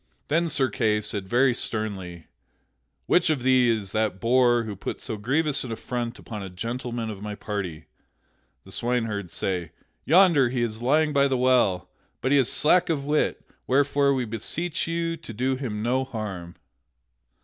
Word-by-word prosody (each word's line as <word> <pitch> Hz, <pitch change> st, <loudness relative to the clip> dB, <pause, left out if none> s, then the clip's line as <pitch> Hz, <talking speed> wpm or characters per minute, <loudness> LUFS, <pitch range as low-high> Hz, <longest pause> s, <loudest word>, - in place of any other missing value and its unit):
Then 165 Hz, +3 st, +2 dB
Sir 140 Hz, -4 st, +2 dB
Kay 110 Hz, -3 st, +1 dB
said 105 Hz, -2 st, -1 dB
very 125 Hz, +1 st, +4 dB
sternly: 95 Hz, -8 st, -3 dB, 0.8 s
"Which 180 Hz, -1 st, +3 dB
of 140 Hz, -5 st, -1 dB
ye 130 Hz, -2 st, +4 dB
is 110 Hz, -4 st, -1 dB
that 110 Hz, -3 st, -1 dB
boor 120 Hz, +1 st, +3 dB
who 105 Hz, -2 st, -6 dB
put 95 Hz, -, -5 dB
so 115 Hz, -, -5 dB
grievous 140 Hz, +7 st, 0 dB
an 125 Hz, -, -6 dB
affront 120 Hz, +1 st, -4 dB
upon 105 Hz, -3 st, -8 dB
a 95 Hz, -, -6 dB
gentleman 115 Hz, +3 st, -4 dB
of 100 Hz, -2 st, -9 dB
my 105 Hz, 0 st, -5 dB
party?" 95 Hz, -7 st, -5 dB, 0.8 s
The -, -, -14 dB
swineherds 115 Hz, -6 st, -2 dB
say: 90 Hz, -4 st, -3 dB, 0.3 s
"Yonder 165 Hz, -6 st, +5 dB
he 120 Hz, -1 st, -1 dB
is 110 Hz, -1 st, -3 dB
lying 150 Hz, +4 st, +2 dB
by 140 Hz, -1 st, +4 dB
the 135 Hz, -2 st, 0 dB
well; 125 Hz, -8 st, +2 dB, 0.3 s
but 130 Hz, -, -1 dB
he 145 Hz, -, +5 dB
is 130 Hz, -, +2 dB
slack 175 Hz, +4 st, +3 dB
of 145 Hz, -4 st, -1 dB
wit, 150 Hz, +1 st, 0 dB, 0.2 s
wherefore 140 Hz, +1 st, +3 dB
we 130 Hz, -2 st, -1 dB
beseech 150 Hz, +11 st, -2 dB
you 165 Hz, 0 st, -2 dB
to 115 Hz, -, -10 dB
do 130 Hz, +4 st, 0 dB
him 115 Hz, -6 st, -4 dB
no 130 Hz, +3 st, +1 dB
harm." 100 Hz, -9 st, -6 dB
120 Hz, 170 wpm, -25 LUFS, 105-140 Hz, 0.8 s, Yonder